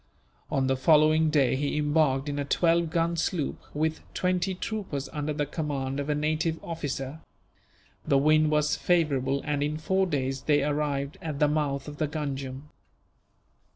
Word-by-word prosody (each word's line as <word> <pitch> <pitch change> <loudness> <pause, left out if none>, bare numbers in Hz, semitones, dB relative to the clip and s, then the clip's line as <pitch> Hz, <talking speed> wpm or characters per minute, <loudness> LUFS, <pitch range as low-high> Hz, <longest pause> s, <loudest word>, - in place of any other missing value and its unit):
On 135 - +1
the 135 0 +2
following 155 +3 +4
day 140 -5 +3
he 145 +2 -1
embarked 150 -2 +2
in 145 0 -2
a - - 0
twelve 165 +3 +2
gun 170 +1 0
sloop, 165 -2 -1
with 155 +1 -1 0.2
twenty 185 +1 0
troopers 185 -9 -4
under 150 +1 -3
the 150 0 -1
command 140 -3 -3
of 145 +1 -3
a 150 - +2
native 155 +2 0
officer. 145 -3 -4 0.8
The 140 - +3
wind 155 +2 +4
was 150 0 +2
favourable 140 -6 +1
and, 145 -1 -1
in 150 +1 -1
four 190 +5 +1
days, 135 -4 -2
they 145 -2 +2
arrived 145 -1 -1
at 155 -3 -4
the 150 - +4
mouth 145 -2 -1
of 145 0 -8
the 155 - 0
Ganjam. 140 -2 -5
150 Hz, 160 wpm, -27 LUFS, 140-160 Hz, 0.8 s, following